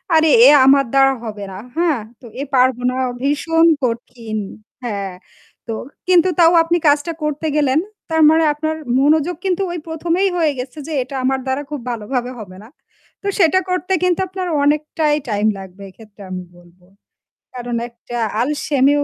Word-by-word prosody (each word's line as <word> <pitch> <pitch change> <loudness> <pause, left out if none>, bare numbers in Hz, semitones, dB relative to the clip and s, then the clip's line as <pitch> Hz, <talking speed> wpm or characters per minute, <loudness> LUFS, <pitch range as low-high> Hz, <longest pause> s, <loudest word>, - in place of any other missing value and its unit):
আরে 315 0 +4 0.2
এ - - +9 0.2
আমার 275 0 +5
দ্বারা 270 0 +5
হবে 210 -2 -6
না 190 - -8 0.2
হ্যাঁ? 320 -9 +1 0.2
তো - - -14 0.2
এ - - -1
পারব 255 0 +4
না। 255 - -3 0.3
ভীষণ 325 +4 +2 0.2
কঠিন। 230 -2 -3 0.5
হ্যাঁ, 200 -5 -4 0.5
তো 225 - -3 0.3
কিন্তু 365 -1 +5
তাও 335 0 +7
আপনি 335 +1 +1
কাজটা 290 +3 +2
করতে 300 +1 -2
গেলেন। 285 -1 +2 0.3
তার 320 0 +1
মানে 320 +1 +4
আপনার 315 +1 -3 0.2
মনোযোগ 310 +4 +2
কিন্তু 375 0 0
ওই 345 - -4
১ম 325 +1 -4
এই 395 - +3
হয়ে 320 -3 +2
গেছে 255 +4 -7
যে 320 - -5
এটা 270 +2 -9
আমার 265 +1 +1
দ্বারা 265 +1 -1
খুব 295 - -4
ভালোভাবে 245 +2 -3
হবে 185 -4 -10
না। 225 - -15 0.5
তো 405 - -5
সেটা 355 0 +4
করতে 365 +1 -1
কিন্তু 365 0 +2
আপনার 370 0 -5 0.2
অনেকটাই 300 +1 +1
টাইম 210 0 +1
লাগবে 190 +1 -11
এক্ষেত্রে 210 +1 -17
আমি 185 0 -5
বলব। 175 +1 -21 0.8
কারণ 245 -1 -4
একটা 235 0 -9 0.2
আলসেমিও 285 +1 +1
280 Hz, 165 wpm, -18 LUFS, 235-320 Hz, 0.8 s, এ